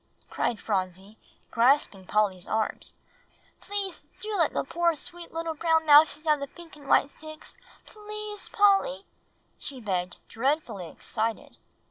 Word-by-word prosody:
cried 225 Hz, -, -1 dB
Phronsie, 190 Hz, +1 st, -3 dB, 0.3 s
grasping 235 Hz, -5 st, +3 dB
Polly's 200 Hz, -4 st, +1 dB
arm, 220 Hz, 0 st, 0 dB, 0.8 s
"please 400 Hz, -3 st, -3 dB, 0.2 s
do 430 Hz, 0 st, -3 dB
let 330 Hz, -6 st, +3 dB
the -, -, -1 dB
poor, 340 Hz, +3 st, +1 dB
sweet 340 Hz, +3 st, -9 dB
little 330 Hz, 0 st, -3 dB
brown 320 Hz, 0 st, +2 dB
mousies 305 Hz, +1 st, +6 dB
have 305 Hz, -2 st, +3 dB
the 280 Hz, -, -4 dB
pink 335 Hz, +3 st, -14 dB
and 290 Hz, -2 st, -14 dB
white 280 Hz, -, +4 dB
sticks. 310 Hz, 0 st, -10 dB, 0.3 s
Please, 425 Hz, 0 st, -7 dB
Polly!" 410 Hz, +5 st, +3 dB, 0.5 s
she 270 Hz, -2 st, -6 dB
begged, 185 Hz, -5 st, -2 dB
dreadfully 230 Hz, -, -1 dB
excited. 225 Hz, +5 st, -4 dB
295 Hz, 130 wpm, -27 LUFS, 220-340 Hz, 0.8 s, mousies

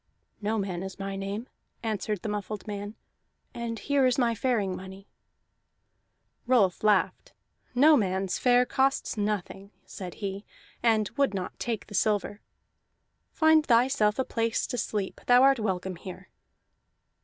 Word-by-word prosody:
"No 215 Hz, +2 st, 0 dB
man 190 Hz, -4 st, -3 dB
is 190 Hz, -1 st, -7 dB
my 195 Hz, 0 st, -4 dB
name," 200 Hz, +5 st, -4 dB, 0.4 s
answered 210 Hz, -3 st, -2 dB
the 215 Hz, -, -3 dB
muffled 210 Hz, 0 st, -4 dB
man, 205 Hz, 0 st, -6 dB, 0.6 s
"and 235 Hz, -1 st, -4 dB
here 275 Hz, +3 st, +2 dB
is 250 Hz, -, +1 dB
my 240 Hz, -3 st, +2 dB
faring 215 Hz, -5 st, 0 dB
money." 190 Hz, +1 st, -10 dB, 1.4 s
Rolf 215 Hz, -9 st, +3 dB
laughed. 190 Hz, -3 st, +1 dB, 0.4 s
"No 300 Hz, +5 st, +7 dB
man's 190 Hz, -4 st, 0 dB
fare 245 Hz, 0 st, +4 dB
costs 270 Hz, +2 st, 0 dB
nothing," 205 Hz, -2 st, -3 dB, 0.2 s
said 180 Hz, -2 st, -8 dB
he, 200 Hz, -1 st, -5 dB, 0.4 s
and 220 Hz, -3 st, +3 dB
would 275 Hz, -8 st, +2 dB
not 185 Hz, -2 st, -5 dB
take 230 Hz, -3 st, -3 dB
the -, -, -13 dB
silver. 205 Hz, +1 st, 0 dB, 0.9 s
"Find 315 Hz, -1 st, +4 dB
thyself 235 Hz, -4 st, +3 dB
a 260 Hz, -, 0 dB
place 230 Hz, 0 st, -1 dB
to 245 Hz, -, -4 dB
sleep; 205 Hz, -3 st, -3 dB
thou 245 Hz, +1 st, +6 dB
art 270 Hz, -2 st, +5 dB
welcome 190 Hz, -3 st, -2 dB
here." 185 Hz, +1 st, -10 dB
210 Hz, 140 wpm, -28 LUFS, 195-240 Hz, 1.4 s, No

